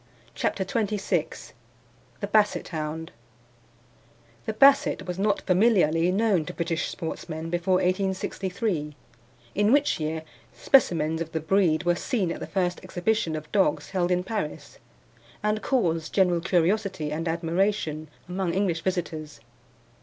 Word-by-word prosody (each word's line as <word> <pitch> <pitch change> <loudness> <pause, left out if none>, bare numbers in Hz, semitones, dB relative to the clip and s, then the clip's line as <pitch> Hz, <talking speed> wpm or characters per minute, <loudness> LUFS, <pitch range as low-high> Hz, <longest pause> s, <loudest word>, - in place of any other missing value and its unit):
CHAPTER 190 - -1
XXVI 210 -1 -2 0.7
THE - - 0
BASSET 210 0 +2
HOUND 160 0 -4 1.4
The - - -1
Basset 275 +5 +4
was 180 0 -4
not 205 0 +1
familiarly 180 -4 +3
known 200 -4 +2
to - - -7
British 165 -1 -1
sportsmen 160 0 -5
before 175 +2 +1
1863, 185 -3 -1 0.6
in 205 +2 +2
which 285 -7 +3
year 155 +1 -3 0.3
specimens 160 - +3
of 165 -1 -5
the 160 - 0
breed 165 0 +2
were 175 0 +3
seen 185 0 -1
at - - -5
the - - -6
first 180 -2 -1
exhibition 175 -3 -1
of 155 0 -7
dogs 150 -7 +1
held 180 -2 0
in 180 0 +1
Paris, 200 -6 -5 0.6
and 210 0 0
caused 165 - 0
general 180 -3 +3
curiosity 180 -2 0
and 165 +2 -3
admiration 165 -1 -1 0.2
among 180 -1 -2
English 185 -4 0
visitors. 160 -5 -3
180 Hz, 130 wpm, -26 LUFS, 160-200 Hz, 1.4 s, Basset